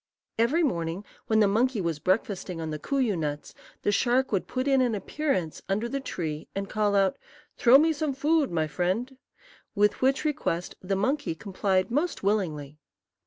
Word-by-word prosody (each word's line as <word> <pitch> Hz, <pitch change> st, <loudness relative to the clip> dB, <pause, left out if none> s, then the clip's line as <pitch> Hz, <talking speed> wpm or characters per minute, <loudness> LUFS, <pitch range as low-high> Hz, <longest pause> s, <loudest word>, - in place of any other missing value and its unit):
Every 280 Hz, +10 st, +3 dB
morning, 170 Hz, -, -2 dB, 0.2 s
when 220 Hz, -1 st, +3 dB
the 205 Hz, -, +5 dB
monkey 230 Hz, +4 st, +1 dB
was 165 Hz, -5 st, -2 dB
breakfasting 185 Hz, -, -1 dB
on 160 Hz, -1 st, -4 dB
the 155 Hz, -, -4 dB
kooyoo 255 Hz, -, 0 dB
nuts, 150 Hz, -3 st, -4 dB, 0.3 s
the -, -, +2 dB
shark 250 Hz, +5 st, +2 dB
would 195 Hz, -4 st, 0 dB
put 255 Hz, +1 st, -2 dB
in 270 Hz, -1 st, +4 dB
an 240 Hz, -3 st, +1 dB
appearance 195 Hz, -, -2 dB
under 210 Hz, +4 st, 0 dB
the 275 Hz, +3 st, -3 dB
tree 160 Hz, -, -4 dB
and 195 Hz, 0 st, -3 dB
call 210 Hz, -1 st, 0 dB
out, 195 Hz, -1 st, +2 dB, 0.4 s
"Throw 245 Hz, +2 st, +7 dB
me 320 Hz, +3 st, +3 dB
some 300 Hz, -3 st, -2 dB
food, 300 Hz, +2 st, +2 dB
my 160 Hz, -2 st, 0 dB
friend;" 185 Hz, -, -2 dB, 0.6 s
with 210 Hz, 0 st, +2 dB
which 270 Hz, +4 st, +2 dB
request 225 Hz, -, -1 dB
the 195 Hz, +1 st, -1 dB
monkey 260 Hz, -, 0 dB
complied 190 Hz, +1 st, -1 dB
most 300 Hz, -, -1 dB
willingly. 155 Hz, -8 st, -1 dB
205 Hz, 170 wpm, -27 LUFS, 180-265 Hz, 0.6 s, Throw